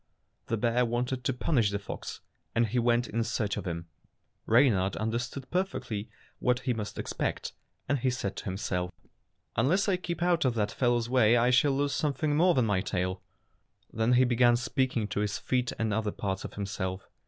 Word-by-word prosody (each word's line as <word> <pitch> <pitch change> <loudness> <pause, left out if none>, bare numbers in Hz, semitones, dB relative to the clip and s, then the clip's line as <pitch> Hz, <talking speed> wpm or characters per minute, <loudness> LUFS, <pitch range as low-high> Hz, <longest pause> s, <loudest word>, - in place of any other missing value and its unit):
The 115 - 0
bear 120 +3 +2
wanted 125 +2 -1
to - - +2
punish 125 -4 +1
the 100 - -1
fox, 100 - -7 0.3
and 115 0 +4
he 120 +3 0
went 120 0 +2
in 115 +2 -1
search 110 -2 -1
of - - -5
him. 85 -1 -4 0.6
Reynard 105 -6 +4
under 110 +2 -1
stood 125 +2 -6
perfectly 140 - -2 0.3
what 125 0 +1
he 125 - 0
must 105 -2 -5
expect, - - -3 0.3
and 140 -1 +1
he 130 - +1
said 120 -6 -3
to - - -6
himself, 90 -2 -2 0.7
"Unless 160 - +2
I 190 -2 +2
keep 170 -2 -3
out 175 -1 +3
of 125 -3 +1
that 105 -2 0
fellow's 120 -2 +1
way 120 -2 +4
I 120 +1 +3
shall 135 +3 +4
lose 140 0 0
something 150 +1 0
more 175 +3 +4
than 125 -3 +3
my 100 -4 +1
tail." 95 -1 -2 0.7
Then 115 +2 +2
he 125 +1 +6
began 120 -1 +4
speaking 125 -2 0
to - - -2
his 105 -1 -1
feet 125 -1 0
and 110 -1 0
other 110 0 0
parts 95 -1 -3
of - - -7
himself. 95 -2 -4
120 Hz, 190 wpm, -29 LUFS, 105-130 Hz, 0.7 s, he